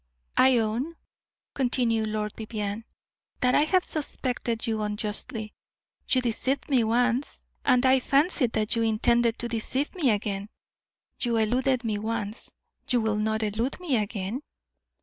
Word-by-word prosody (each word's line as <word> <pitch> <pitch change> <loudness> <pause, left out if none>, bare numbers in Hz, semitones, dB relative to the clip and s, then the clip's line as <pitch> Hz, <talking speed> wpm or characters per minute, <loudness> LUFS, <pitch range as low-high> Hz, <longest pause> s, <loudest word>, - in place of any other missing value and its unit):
"I 260 -1 +6
own," 235 +9 -1 0.6
continued 240 -4 +1
Lord 215 -1 -2
Vivianne, 215 -1 -4 0.6
"that 250 -1 +3
I - - +5
have 365 +3 +3
suspected 250 -6 -2
you 220 -2 -1
unjustly. 210 +1 -4 0.6
You 255 - +4
deceived 255 +4 -1
me 255 -4 +4
once, 245 +4 0 0.2
and 250 +1 +4
I 260 0 +6
fancied 275 -2 +2
that 215 0 +1
you 230 - +1
intended 230 +1 +2
to 240 - -2
deceive 240 +5 -2
me 330 -9 +1
again; 205 -1 -1 0.7
you 235 -2 +1
eluded 250 +3 +1
me 215 -3 -1
once, 215 0 -4 0.4
you 245 - +4
will 220 -2 0
not 220 +1 0
elude 225 - -1
me 340 -8 0
again?" 210 +3 -3
230 Hz, 140 wpm, -27 LUFS, 215-255 Hz, 0.7 s, I